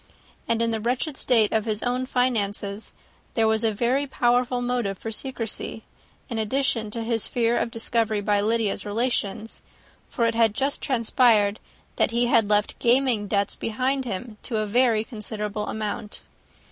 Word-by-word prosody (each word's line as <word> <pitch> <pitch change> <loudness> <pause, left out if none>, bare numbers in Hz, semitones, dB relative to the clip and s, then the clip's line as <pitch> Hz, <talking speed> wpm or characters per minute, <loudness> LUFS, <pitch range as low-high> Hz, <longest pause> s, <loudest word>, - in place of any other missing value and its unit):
And 230 0 +1
in 230 - +1
the 225 - -1
wretched 250 +6 -1
state 230 -6 +3
of 220 -1 +1
his 215 -2 -2
own 250 +1 -1
finances, 210 -5 -1 0.4
there 225 -1 +3
was 220 +1 +2
a 225 - +3
very 250 +7 0
powerful 245 -1 +1
motive 245 -5 -1
for 225 - -6
secrecy, 225 -2 -4 0.4
in 230 -4 -3
addition 225 -1 0
to 230 +2 -4
his 225 -1 -1
fear 235 -1 +1
of 240 - 0
discovery 225 -1 0
by 205 0 +1
Lydia's 215 -1 0
relations; 220 -1 -2 0.5
for 235 - 0
it 230 - +2
had 225 -2 +3
just 275 +1 0
transpired 230 -5 +3 0.4
that - - +3
he 235 +1 +1
had 230 -4 +3
left 210 0 +1
gaming 240 -3 +2
debts 200 0 0
behind 260 +4 -1
him 220 0 -5
to 230 - -3
a 215 - 0
very 225 0 +3
considerable 210 -2 -5
amount. 210 -1 -4
225 Hz, 160 wpm, -25 LUFS, 210-245 Hz, 0.5 s, state